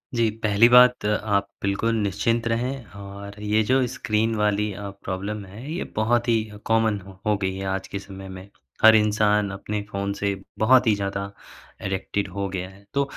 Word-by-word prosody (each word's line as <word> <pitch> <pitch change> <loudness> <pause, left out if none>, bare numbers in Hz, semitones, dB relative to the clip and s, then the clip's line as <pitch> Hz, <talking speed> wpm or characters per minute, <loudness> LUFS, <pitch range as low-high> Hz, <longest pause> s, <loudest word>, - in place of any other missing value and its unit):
जी, 115 -1 +3
पहली 105 +2 +5
बात 125 -1 +6
आप 105 -1 +1
बिल्कुल 100 +4 0
निश्चिंत 115 +4 0
रहें 125 +3 -1
और 100 0 -9
ये 105 +1 +2
जो 130 0 +4
स्क्रीन 110 -1 0
वाली 105 0 +1
अ, 100 0 -6
प्रॉब्लम 100 +3 -4
है 115 +10 -9
ये 175 - -2
बहुत 120 +3 +1
ही 115 - +4 0.3
कॉमन 110 -2 +2
हो 95 -1 -13
हो 105 0 +3
गई 95 -1 -1
है 95 0 -5
आज 95 0 -2
के 100 - -5
समय 95 -1 -10
में। 95 +1 -9 0.4
हर 110 0 +9
इंसान 105 -1 +3
अपने 105 +1 -4
फ़ोन 100 0 -2
से 100 0 0 0.3
बहुत 125 +2 +5
ही 110 - +5
ज़्यादा 100 0 -3 0.5
एडिक्टेड 95 +1 -2
हो 100 -1 -1
गया 95 -1 -4
है 95 +1 -18
तो 140 - +2
105 Hz, 180 wpm, -24 LUFS, 100-115 Hz, 0.5 s, हर